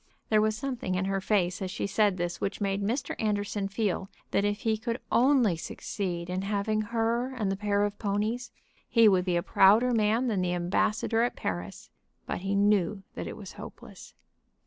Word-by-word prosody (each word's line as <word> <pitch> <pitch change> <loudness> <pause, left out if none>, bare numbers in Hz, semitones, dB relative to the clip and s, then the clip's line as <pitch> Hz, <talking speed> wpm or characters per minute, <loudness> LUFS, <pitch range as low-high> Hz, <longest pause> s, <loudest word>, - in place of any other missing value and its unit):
There 215 -1 +4
was 215 0 +1
something 240 -7 -3
in 185 +1 0
her 195 0 -1
face 185 -3 +1
as 190 - -2
she - - -3
said 200 -1 +2
this 175 0 -3
which 195 - -2
made 200 -1 -1
Mr. 235 +6 -2
Anderson 205 -1 -1
feel 195 -2 -2 0.2
that 200 - +2
if 205 0 -1
he 225 -2 +1
could 230 +2 -3
only 250 -7 +4
succeed 175 +1 -4
in 180 +1 -2
having 205 +2 0
her 230 +3 0
and 210 -6 -1
the - - 0
pair 205 0 +1
of 205 0 -5
ponies 215 +4 -1 0.4
he 230 -2 +6
would 185 -3 +4
be 180 -2 +1
a 170 - +1
prouder 220 +6 +5
man 225 +2 +2
than 215 -6 0
the 180 -1 0
ambassador 215 +6 +1
at 240 - 0
Paris. 90 +1 -5 0.3
But - - -3
he 195 +2 -2
knew 200 -1 +2
that - - -5
it - - -7
was - - -9
hopeless. - - -11
205 Hz, 190 wpm, -28 LUFS, 190-225 Hz, 0.4 s, he